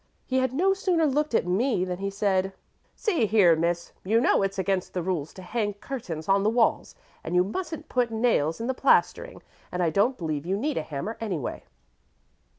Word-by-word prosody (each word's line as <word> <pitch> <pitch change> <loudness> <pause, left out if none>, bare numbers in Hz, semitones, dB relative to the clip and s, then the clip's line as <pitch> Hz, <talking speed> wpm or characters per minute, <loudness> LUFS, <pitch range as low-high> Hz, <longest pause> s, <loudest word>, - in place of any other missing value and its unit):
He 260 0 0
had 260 -1 +1
no 370 +9 +2
sooner 365 -4 +1
looked 295 -2 0
at - - +2
me 185 +2 +1
than 180 0 -4
he 195 0 -2
said, 195 -1 0 0.4
'See 340 - +1
here, 195 -6 +5
miss; 170 +1 -1
you 220 +4 +3
know 235 - +3
it's 195 0 -1
against 190 -1 -1
the 180 - -1
rules 165 -5 -2
to 185 - -10
hang 205 +1 -2
curtains 200 - -6
on 195 0 +4
the 210 - +2
walls, 230 0 +1 0.3
and 170 - -3
you 180 - +5
mustn't 315 - -5
put 250 -4 +1
nails 220 -9 +1
in 230 - -3
the 260 - 0
plastering, - - +1 0.3
and 180 0 -1
I 165 - +2
don't 235 +9 +2
believe 155 -5 -3
you 190 +4 -1
need 285 +6 -2
a - - -2
hammer 155 +9 -5
anyway.'" 180 - -4
200 Hz, 200 wpm, -26 LUFS, 180-255 Hz, 0.4 s, here